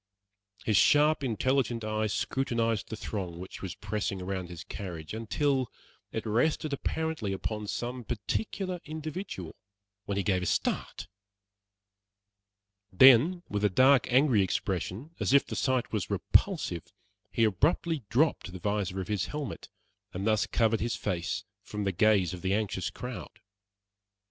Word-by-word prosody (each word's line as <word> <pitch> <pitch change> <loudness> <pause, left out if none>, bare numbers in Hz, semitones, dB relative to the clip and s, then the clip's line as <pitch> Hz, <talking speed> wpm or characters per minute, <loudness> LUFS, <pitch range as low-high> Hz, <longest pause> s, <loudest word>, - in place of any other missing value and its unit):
His 110 - +3
sharp, 150 0 +5
intelligent 125 -1 0
eye 110 0 0
scrutinized 115 -1 -1
the - - -4
throng 95 -5 -5
which 90 +2 -8
was 95 -1 -5
pressing 105 -2 -3
around 95 -1 -4
his 90 0 -8
carriage, 85 -5 -7
until 130 +3 0 0.4
it 110 - -4
rested 145 +7 +1
apparently 150 -6 -2
upon 105 +2 -4
some 120 +5 -3
particular 180 - -3
individual, 155 - -6 0.5
when 100 - -2
he 100 - +1
gave 95 -1 +1
a 90 - -2
start; - - -1 1.8
then, 135 - +7
with 105 0 -2
a 105 - +5
dark, 130 +6 +5
angry 130 -4 +5
expression, 95 - -2
as - - +1
if 140 - +6
the - - -5
sight 130 -3 0
was 105 -4 -1
repulsive, 85 -1 +1 0.4
he 115 - +2
abruptly 150 - +1
dropped 135 - +2
the 95 - -7
visor 100 -1 -1
of 90 - -6
his 105 -3 -1
helmet 150 -3 -5 0.5
and 95 +2 -3
thus 110 -1 +2
covered 115 -1 +2
his 115 0 -1
face 95 -4 -2 0.2
from 105 0 -5
the 100 - +1
gaze 95 -2 +3
of 90 - -7
the 95 +1 +1
anxious 105 -3 -1
crowd. 125 -1 -8
110 Hz, 145 wpm, -29 LUFS, 95-135 Hz, 1.8 s, then